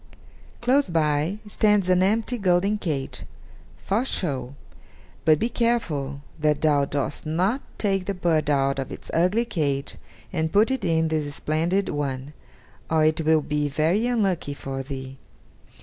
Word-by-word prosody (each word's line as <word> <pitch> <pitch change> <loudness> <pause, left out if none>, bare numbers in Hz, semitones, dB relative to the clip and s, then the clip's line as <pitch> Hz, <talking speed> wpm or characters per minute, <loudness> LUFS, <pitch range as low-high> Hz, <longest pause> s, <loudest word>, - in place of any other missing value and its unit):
Close 260 +2 +3
by 155 +2 +1
stands 210 -2 +2
an 185 0 +4
empty 225 +5 +1
golden 190 +2 +2
cage, 145 -8 -3 0.6
for 210 +5 0
show; 140 - -2 0.7
but 155 -1 +6
be 230 - 0
careful 160 - -1 0.2
that 150 -1 +1
thou 145 -3 +3
dost 140 -1 -3
not 185 - 0 0.2
take 195 -3 0
the 200 +1 -2
bird 165 -4 +1
out 135 -1 +2
of 135 - -4
its - - -7
ugly 185 +8 +2
cage 140 -10 -2 0.4
and 160 -2 0
put 215 +5 +4
it 265 -2 -1
in 160 -2 +2
the 155 -2 -1
splendid 165 +7 0
one, 140 -1 -3 0.6
or 160 -1 +3
it 155 +1 +2
will 160 0 +3
be 150 0 -1
very 160 - +1
unlucky 195 -11 0
for 135 -1 -5
thee." 135 0 -7
160 Hz, 150 wpm, -24 LUFS, 145-200 Hz, 0.7 s, but